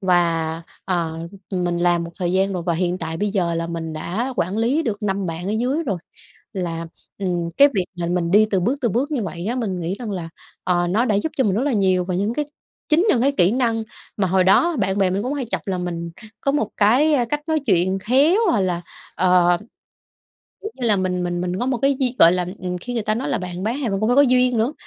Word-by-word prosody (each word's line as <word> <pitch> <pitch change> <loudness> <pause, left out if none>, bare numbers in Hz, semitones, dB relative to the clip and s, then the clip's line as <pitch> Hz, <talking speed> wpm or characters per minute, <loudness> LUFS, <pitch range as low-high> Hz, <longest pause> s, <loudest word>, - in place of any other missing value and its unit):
Và, 170 -3 +1 0.2
ờ, 165 -3 -2 0.3
mình 175 -2 -1
làm 175 -1 +2
một 170 - -7
thời 175 -1 -1
gian 195 +1 +1
rồi 180 -2 -3
và 170 -1 0
hiện 180 +1 -1
tại 165 0 -4
bây 205 +3 -1
giờ 175 -4 0
là 165 0 -2
mình 165 -1 -5
đã 205 +12 -3
quản 185 +5 -1
lý 260 +8 +1
được 215 -5 -3
5 195 -1 -1
bạn 165 +2 -4
ở - - -1
dưới 255 +9 0
rồi. 200 - -2 0.6
Là, 170 -3 -3 0.3
ừm, 175 -3 -1
cái 285 - +8
việc 185 -2 +1
là 175 -1 -3
mình 175 -1 -1
đi 215 +2 +5
từ 190 - +2
bước, 235 +10 +1
từ 235 - +1
bước 260 +8 -1
như 250 -7 -1
vậy 180 -1 -5
á, 240 +3 -1
mình 195 -8 -2
nghĩ 175 +4 -2
rằng 225 -4 -5
là, 170 -4 -5 0.3
ờ, 175 -1 +1
nó 220 +8 +1
đã 215 - +1
giúp 205 +10 -1
cho 265 - +3
mình 200 - +1
rất 235 - +1
là 285 -3 0
nhiều, 185 -3 +2
và 185 - -2
những 205 +5 0
cái 295 +1 -1 0.4
chính 330 +7 +4
những 240 - +3
cái 280 +2 +3
kỹ 180 -8 +3
năng 230 -2 0 0.3
mà 195 - +1
hồi 185 +1 +3
đó 335 - +4
bạn 195 -2 0
bè 190 -2 +3
mình 195 +3 -1
cũng 265 +3 -2
hay 275 -4 -3
chọc - - -2
là 190 - -1
mình 170 -1 -4 0.3
có 275 - +1
một 250 -7 0
cái, 250 +10 +4
a, 250 -5 +2
cách 295 +6 -2
nói 315 -1 +1
chuyện 190 -2 +2
khéo 275 - +3
hoặc 210 - +2
là, 175 -2 -1 0.3
ờ, 180 -1 +4 1.1
kiểu 425 - -4
như 245 -2 -3
là, 210 -2 +4
mình 180 -1 -1
mình 175 0 -2
mình 180 +1 -2
có 250 - -1
một 260 -2 0
cái 275 -1 +3
di 255 -2 +1
gọi 165 +1 +7
là, 180 -1 0
ừm, 180 0 -4
khi 245 +7 -6
người 230 - -1
ta 215 +1 0
nói 240 +4 -3
là 235 - 0
bạn 180 -1 -6
bán 230 +6 -1
hàng 255 -6 -1
bạn 195 - -1
cũng 215 - +1
phải 250 - +3
có 285 - +8
duyên 250 -2 +3
nữa, 240 +7 +1
195 Hz, 260 wpm, -21 LUFS, 175-245 Hz, 1.1 s, cái